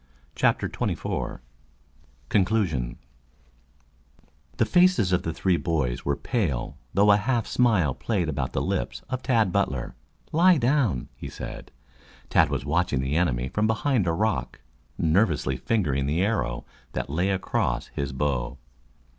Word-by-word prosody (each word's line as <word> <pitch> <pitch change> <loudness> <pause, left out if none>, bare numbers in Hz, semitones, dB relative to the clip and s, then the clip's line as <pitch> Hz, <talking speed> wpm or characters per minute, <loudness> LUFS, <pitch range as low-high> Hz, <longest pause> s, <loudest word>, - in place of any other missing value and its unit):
CHAPTER - - +2
XXIV - - -3 0.9
CONCLUSION 90 - +1 1.6
The - - +3
faces 180 - +4
of 90 - +2
the 80 - -3
three 90 +2 +1
boys 70 -9 -1
were 70 - 0
pale, 85 - -2 0.2
though 100 +2 +5
a 100 - +6
half 120 +1 0
smile 105 - +2
played 95 - -1
about 70 -4 -2
the - - 0
lips - - -2
of 130 0 -2
Tad 110 -7 +2
Butler. 70 -11 -1 0.4
"Lie 175 +2 +5
down!" 120 - +1
he - - -7
said. - - -8 0.6
Tad 80 - +4
was 70 -3 -2
watching 75 -3 +1
the 65 +3 -1
enemy 65 -8 +1
from 105 +7 +1
behind 110 -2 +1
a - - +3
rock, 80 - -1 0.4
nervously 80 -5 +2
fingering 70 - 0
the 80 +6 +1
arrow 95 - -1 0.3
that - - -3
lay 90 +6 +1
across 65 -10 -1
his 70 -1 -3
bow. 65 -2 -2
85 Hz, 140 wpm, -26 LUFS, 70-110 Hz, 1.6 s, a